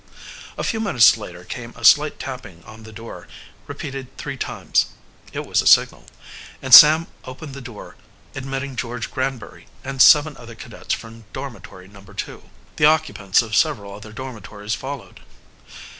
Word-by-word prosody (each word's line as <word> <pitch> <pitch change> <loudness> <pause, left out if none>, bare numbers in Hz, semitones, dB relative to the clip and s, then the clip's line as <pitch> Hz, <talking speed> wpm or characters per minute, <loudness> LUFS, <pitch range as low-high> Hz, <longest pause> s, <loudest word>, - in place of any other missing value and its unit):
A - - -4
few 225 - -2
minutes 135 - +5
later 90 -5 -10
came 120 +3 -8
a 115 - -6
slight 150 +5 +5
tapping 105 -10 -9
on 110 +1 -13
the 110 0 -12
door, 115 +2 -11 0.4
repeated 135 -2 -7
three - - -6
times. - - -1 0.4
It - - -5
was - - +1
a - - -2
signal, - - +4 0.5
and 130 -1 -2
Sam 155 +4 +10 0.2
opened 135 +3 -10
the 140 - -9
door, 120 -4 -11 0.4
admitting 135 0 -5
George 120 -1 -5
Granbury 130 -3 -5 0.2
and 135 -1 -2
seven 150 -1 +6
other 120 -1 -12
cadets - - -5
from 115 0 -13
dormitory 95 -8 -9
No. 100 0 -16
2. 100 - -9 0.3
The 150 - +3
occupants 125 -10 +2
of 110 -2 -5
several 115 -11 0
other 105 +2 -11
dormitories 110 -3 -7
followed. 135 0 -7
125 Hz, 155 wpm, -21 LUFS, 110-135 Hz, 0.5 s, Sam